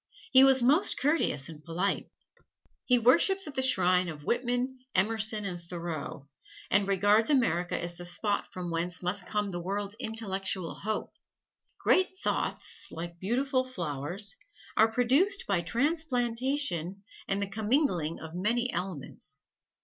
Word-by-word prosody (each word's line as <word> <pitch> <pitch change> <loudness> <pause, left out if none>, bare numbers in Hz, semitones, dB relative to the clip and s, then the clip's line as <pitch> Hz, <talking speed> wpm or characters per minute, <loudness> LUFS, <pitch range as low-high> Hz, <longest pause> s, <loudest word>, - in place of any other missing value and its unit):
He 260 0 +8
was 265 -2 +5
most 295 +10 +4
courteous 280 - +1
and 155 -2 -11
polite. 175 +4 -2 0.8
He 250 - +4
worships 330 - +4
at 300 - -5
the 265 - 0
shrine 185 -8 +4
of 150 -2 -8
Whitman, 245 - -1 0.2
Emerson 215 +2 +1
and 175 -3 -4
Thoreau, 170 -5 -6 0.4
and 200 0 +3
regards 205 +4 +3
America 180 - +1
as 175 0 -4
the 175 +1 -9
spot 205 +4 -2
from 180 -2 -5
whence 175 +2 -2
must 180 +1 -1
come 210 -2 -1
the 175 - -4
world's 200 +3 -3
intellectual 195 -6 -3
hope. 215 +1 -4 0.6
"Great 375 0 +2
thoughts, - - -1
like 170 +1 -7
beautiful 255 - 0
flowers, 175 - -5 0.4
are 220 +1 +4
produced 275 - +2
by 195 -4 +1
transplantation 245 - 0 0.2
and 195 - 0
the 200 - 0
commingling 205 - 0
of 160 0 -9
many 235 +7 0
elements." 175 -5 -6
205 Hz, 135 wpm, -29 LUFS, 175-250 Hz, 0.8 s, He